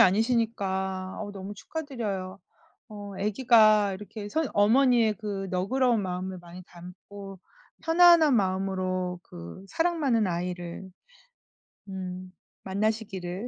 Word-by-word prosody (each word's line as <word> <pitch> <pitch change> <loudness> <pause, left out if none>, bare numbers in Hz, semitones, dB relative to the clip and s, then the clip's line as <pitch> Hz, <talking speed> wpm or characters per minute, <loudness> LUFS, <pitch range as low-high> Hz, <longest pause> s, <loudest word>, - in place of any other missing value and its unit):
아니시니까 190 -3 +1
아우 205 - -5
너무 195 +1 -7
축하드려요. 205 -9 -5 0.5
어 205 -1 -9
아기가 215 -1 +4
이렇게 205 +2 -8
선 315 +7 0
어머니의 230 +1 +4
그 200 -3 -4
너그러운 230 +6 +1
마음을 185 0 -4
많이 175 +1 -11
담고 190 +2 -11 0.4
편안한 330 -3 +6
마음으로 185 -2 -1
그 85 - -11
사랑 335 - 0
많은 235 -8 +2
아이를 175 +1 -4 1.0
음 185 -1 -6 0.3
만나시기를. 195 -1 -2
200 Hz, 265 characters per minute, -27 LUFS, 185-225 Hz, 1.0 s, 편안한